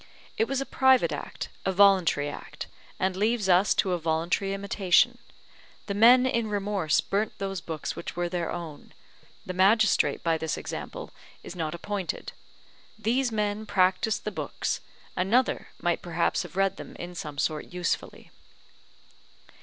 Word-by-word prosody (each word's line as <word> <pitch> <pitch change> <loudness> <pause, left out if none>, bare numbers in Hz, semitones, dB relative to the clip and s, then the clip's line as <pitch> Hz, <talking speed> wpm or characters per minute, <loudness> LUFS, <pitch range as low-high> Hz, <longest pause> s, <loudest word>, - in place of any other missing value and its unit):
It 225 - +1
was 270 0 -1
a 275 - -2
private 265 -1 +4
act, - - -5
a 190 - +1
voluntary 185 -6 +4
act, 145 - -7 0.3
and 190 0 0
leaves 215 +1 +1
us 185 +2 +4
to 190 - +1
a 175 - 0
voluntary 165 +4 0
imitation: 200 +4 +2 0.7
the 200 - -3
men 240 +5 +7
in 235 -4 0
remorse 200 -6 +1
burnt 205 +2 -2
those 195 -2 -3
books 160 -2 -5
which - - -6
were 175 0 -1
their 175 -1 -2
own; 165 -4 -8 0.5
the 185 - -4
magistrate 205 +4 +3
by 165 -1 +1
this 160 -1 -2
example - - -6 0.3
is - - -8
not 160 -2 -3
appointed; 195 +1 -4 0.7
these 240 +3 +1
men 210 0 -1
practised 190 +3 +2
the - - -3
books, - - -3 0.4
another 225 +8 +1
might 175 -1 0
perhaps 170 -1 0
have 175 -1 -9
read 195 0 +2
them - - -9
in 175 +1 -7
some 150 -4 -7
sort 150 +1 -2
usefully. 175 -1 -3
190 Hz, 150 wpm, -27 LUFS, 175-215 Hz, 0.7 s, men